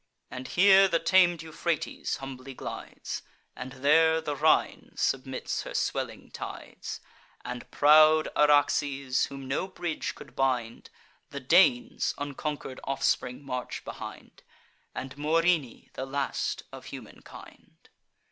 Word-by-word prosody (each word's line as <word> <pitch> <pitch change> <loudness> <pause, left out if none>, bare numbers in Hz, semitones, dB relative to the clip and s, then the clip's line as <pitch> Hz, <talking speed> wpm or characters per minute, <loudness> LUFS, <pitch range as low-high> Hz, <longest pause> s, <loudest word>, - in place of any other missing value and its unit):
And 130 0 -6
here 195 +3 +6
the 170 -3 +2
tam'd 175 0 +3
Euphrates 160 0 -3
humbly 135 0 -8
glides, - - -6 0.3
And 125 +1 -7
there 160 +4 +4
the 150 -2 -3
Rhine 155 +2 +2
submits 130 0 -1
her - - -8
swelling - - -3
tides, - - -7 0.4
And 125 -1 -6
proud 155 +1 +6
Araxes, 145 -2 +3
whom 135 -1 -9
no 140 +8 -1
bridge 175 -4 -4
could 130 -3 -13
bind; 125 -4 -1 0.4
The 140 - -6
Danes' 245 - +3
unconquer'd 145 -1 -5
offspring 135 -1 -1
march 125 -2 -5
behind, - - -9 0.5
And 130 0 -6
Morini, 160 -3 +1
the 130 - -5
last 140 +1 -2
of - - -10
humankind. - - -13
145 Hz, 115 wpm, -28 LUFS, 130-165 Hz, 0.5 s, here